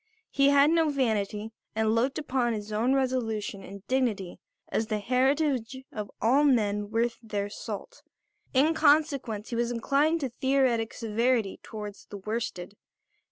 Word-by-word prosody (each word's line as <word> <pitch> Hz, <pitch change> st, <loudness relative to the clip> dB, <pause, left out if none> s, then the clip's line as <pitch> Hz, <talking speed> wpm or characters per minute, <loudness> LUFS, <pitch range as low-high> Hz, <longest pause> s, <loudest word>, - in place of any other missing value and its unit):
He 275 Hz, 0 st, +4 dB
had 285 Hz, +2 st, +5 dB
no 325 Hz, -2 st, +3 dB
vanity 220 Hz, -5 st, -1 dB, 0.2 s
and 220 Hz, 0 st, +2 dB
looked 245 Hz, +4 st, +1 dB
upon 255 Hz, -5 st, 0 dB
his 210 Hz, -1 st, -5 dB
own 240 Hz, +5 st, +2 dB
resolution 225 Hz, -7 st, -1 dB
and 200 Hz, +1 st, -10 dB
dignity 230 Hz, -9 st, -1 dB, 0.3 s
as 220 Hz, -, -1 dB
the 215 Hz, -2 st, -1 dB
heritage 260 Hz, +2 st, +1 dB
of 210 Hz, -2 st, -5 dB
all 260 Hz, +6 st, +4 dB
men 210 Hz, -7 st, +2 dB
worth 230 Hz, +2 st, 0 dB
their 205 Hz, -3 st, -3 dB
salt; -, -, -7 dB, 0.5 s
in 285 Hz, +5 st, +4 dB
consequence 280 Hz, -9 st, +2 dB
he -, -, -2 dB
was 235 Hz, 0 st, 0 dB
inclined 285 Hz, +7 st, +1 dB
to 270 Hz, -, -1 dB
theoretic 250 Hz, -2 st, +1 dB
severity 230 Hz, -1 st, 0 dB
towards 210 Hz, -2 st, -8 dB
the 205 Hz, -, -8 dB
worsted. 200 Hz, -3 st, -4 dB
235 Hz, 145 wpm, -28 LUFS, 215-270 Hz, 0.5 s, had